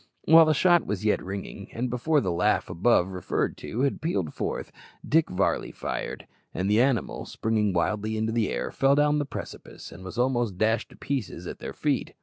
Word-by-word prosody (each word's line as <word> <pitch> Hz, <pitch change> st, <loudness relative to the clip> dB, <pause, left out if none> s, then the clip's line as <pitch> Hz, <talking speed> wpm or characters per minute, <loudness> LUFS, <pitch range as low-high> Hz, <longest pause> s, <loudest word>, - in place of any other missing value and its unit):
While 165 Hz, +1 st, +8 dB
the 155 Hz, -1 st, +3 dB
shot 175 Hz, +2 st, +4 dB
was 105 Hz, 0 st, -3 dB
yet 105 Hz, -, +2 dB
ringing, 100 Hz, +1 st, -6 dB
and 125 Hz, +2 st, -2 dB
before 130 Hz, +5 st, +1 dB
the 95 Hz, -, -1 dB
laugh 85 Hz, +1 st, +1 dB
above 95 Hz, 0 st, +3 dB
referred 90 Hz, -1 st, -2 dB
to 120 Hz, -, -4 dB
had 140 Hz, 0 st, 0 dB
pealed 95 Hz, -, -1 dB
forth, -, -, -4 dB, 0.4 s
Dick 160 Hz, +1 st, +3 dB
Varley 90 Hz, +1 st, 0 dB
fired, -, -, -5 dB, 0.3 s
and 95 Hz, -, -1 dB
the 105 Hz, +3 st, +4 dB
animal, 130 Hz, -2 st, 0 dB
springing 110 Hz, -2 st, 0 dB
wildly 105 Hz, +5 st, -1 dB
into 110 Hz, +1 st, 0 dB
the 115 Hz, -3 st, +1 dB
air, -, -, -3 dB
fell 135 Hz, +1 st, +3 dB
down 150 Hz, 0 st, +3 dB
the 145 Hz, -, -1 dB
precipice, -, -, -8 dB
and 90 Hz, +2 st, -11 dB
was 95 Hz, +3 st, -8 dB
almost 120 Hz, -6 st, +1 dB
dashed 110 Hz, +2 st, +1 dB
to -, -, -15 dB
pieces 115 Hz, -10 st, -4 dB
at -, -, -7 dB
their -, -, -6 dB
feet. -, -, -1 dB
110 Hz, 195 wpm, -26 LUFS, 95-135 Hz, 0.4 s, While